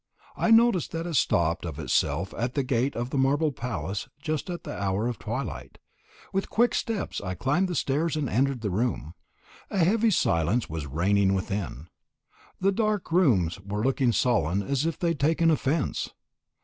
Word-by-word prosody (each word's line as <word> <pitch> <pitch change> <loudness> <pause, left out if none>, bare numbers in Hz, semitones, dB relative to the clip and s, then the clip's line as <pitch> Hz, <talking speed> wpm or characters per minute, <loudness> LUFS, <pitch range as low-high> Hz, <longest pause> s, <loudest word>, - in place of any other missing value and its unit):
I - - 0
noticed 225 -5 +4
that 165 0 -3
it 175 - -4
stopped 85 - +2
of 80 -5 -5
itself 80 +4 0
at 120 +2 -2
the 140 - +1
gate 130 +1 0
of 120 +2 -3
the 140 - 0
marble 145 +3 +2
palace 110 -5 -4
just 155 +3 -3
at 175 -1 -5
the - - -6
hour 100 +3 -1
of 120 -4 -4
twilight. - - -5 0.6
With 195 0 -1
quick 240 +1 +2
steps 225 -3 -2
I 95 -2 -4
climbed 145 - +1
the 180 - -3
stairs, 155 +3 0
and 150 -3 -1
entered 130 +2 +1
the 105 -4 -2
room. 100 -6 -1 0.6
A - - -3
heavy 225 +6 +3
silence 100 - +1
was 80 -2 -5
reigning 95 +6 +2
within. 95 -7 -3 0.7
The 195 +1 +3
dark 210 -3 -1
rooms 110 - +3
were 100 +2 -4
looking 130 -1 +2
sullen 100 - +1
as 140 +7 0
if 165 - -2
they 170 - 0
had 165 -4 -2
taken 165 +3 +3
offence. 150 0 0
130 Hz, 175 wpm, -27 LUFS, 100-165 Hz, 0.7 s, noticed